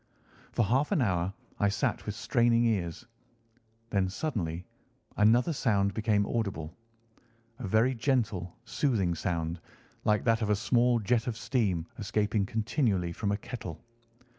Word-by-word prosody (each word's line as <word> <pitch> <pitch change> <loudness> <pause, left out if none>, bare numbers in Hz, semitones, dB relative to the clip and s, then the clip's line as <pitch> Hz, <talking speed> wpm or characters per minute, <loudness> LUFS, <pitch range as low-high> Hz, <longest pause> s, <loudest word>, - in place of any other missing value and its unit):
For 120 - +2
half 130 +8 +1
an - - +3
hour 95 -6 +1 0.3
I 100 - +3
sat 100 - -1
with - - -2
straining 120 0 +3
ears. 95 -3 -1 0.9
Then 95 -3 +2
suddenly 95 - -3 0.5
another 120 +9 +4
sound 100 -7 +1
became 105 -2 +2
audible—a 115 +4 -7
very 110 +6 +3
gentle, 115 -8 0
soothing 105 - +1
sound, 85 0 -2 0.4
like 105 -1 +2
that 115 -1 +2
of 105 - 0
a 105 - +4
small 120 +3 +3
jet 115 +2 +1
of 115 -2 -2
steam 100 -11 0
escaping 105 -1 0
continually 110 - 0
from 100 +4 -2
a 100 - +1
kettle. 90 -8 -7
110 Hz, 135 wpm, -30 LUFS, 95-120 Hz, 0.9 s, another